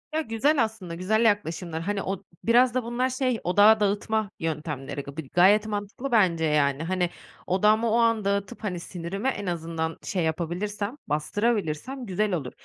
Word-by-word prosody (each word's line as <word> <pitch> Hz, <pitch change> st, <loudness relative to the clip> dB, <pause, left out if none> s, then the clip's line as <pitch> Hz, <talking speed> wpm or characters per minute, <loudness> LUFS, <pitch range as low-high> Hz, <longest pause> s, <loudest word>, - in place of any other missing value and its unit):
Yo, 315 Hz, -5 st, -1 dB
güzel 240 Hz, +5 st, +2 dB
aslında, 210 Hz, -6 st, -5 dB
güzel 220 Hz, +6 st, +1 dB
yaklaşımlar. 170 Hz, -5 st, 0 dB
Hani, 200 Hz, +3 st, -2 dB
o 195 Hz, 0 st, -4 dB, 0.2 s
biraz 240 Hz, +1 st, +4 dB
da 255 Hz, 0 st, 0 dB
bunlar 240 Hz, +2 st, -1 dB
şey, 255 Hz, -2 st, 0 dB
odağı 205 Hz, +5 st, +6 dB
dağıtma 210 Hz, +1 st, 0 dB
yöntemleri. 150 Hz, -3 st, -4 dB
Bi 155 Hz, -4 st, -6 dB
gayet 200 Hz, +5 st, +5 dB
mantıklı 210 Hz, +5 st, -4 dB
bence, 180 Hz, -8 st, +3 dB
yani. 145 Hz, -1 st, +2 dB
Hani, 180 Hz, +1 st, 0 dB, 0.4 s
odağımı 215 Hz, +5 st, +3 dB
o -, -, +3 dB
an 230 Hz, -3 st, +2 dB
dağıtıp, 200 Hz, +3 st, -2 dB
hani, 185 Hz, -4 st, -2 dB
sinirimi 180 Hz, +6 st, -5 dB
en 205 Hz, -6 st, -2 dB
azından 165 Hz, -2 st, -3 dB
şey 185 Hz, -4 st, -1 dB
yapabilirsem, 190 Hz, -, -2 dB
bastırabilirsem 205 Hz, -, -1 dB
güzel 205 Hz, 0 st, 0 dB
olur. 140 Hz, -8 st, -3 dB
200 Hz, 155 wpm, -26 LUFS, 170-225 Hz, 0.4 s, odağı